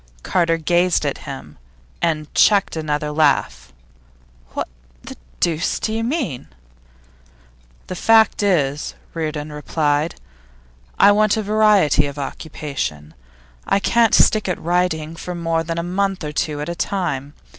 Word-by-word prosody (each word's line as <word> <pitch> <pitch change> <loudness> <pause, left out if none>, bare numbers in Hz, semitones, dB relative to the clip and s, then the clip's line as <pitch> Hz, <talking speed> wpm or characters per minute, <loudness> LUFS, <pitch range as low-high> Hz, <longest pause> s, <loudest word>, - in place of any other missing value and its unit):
Carter 165 -2 +1
gazed 175 +2 +2
at - - -2
him, 75 0 -9 0.4
and 155 -3 -1
checked 200 -4 +4
another 150 -1 -2
laugh. 145 - +1 0.8
'What - - -2 0.4
the - - -9 0.2
deuce 165 0 0
do 220 - -2
you 225 +1 -1
mean?' 240 - -2 1.4
'The 185 - -6
fact 220 +3 +4
is,' 150 -8 0 0.2
Reardon 155 -2 -4
replied, 150 +1 -1 0.8
'I 205 - +7
want 215 0 +3
variety 210 -8 +3
of 140 0 -8
occupation. 140 - -5 0.5
I - - +3
can't 230 +2 +3
stick 215 -3 +4
at 180 - -2
writing 165 -2 -1
for 180 +2 -6
more 165 -1 -1
than 165 +1 -4
a 170 - -1
month 190 +1 -1
or 150 - -4
two 150 0 -2
at 150 - -4
a 170 - -2
time. 170 -7 -3
165 Hz, 135 wpm, -20 LUFS, 150-195 Hz, 1.4 s, I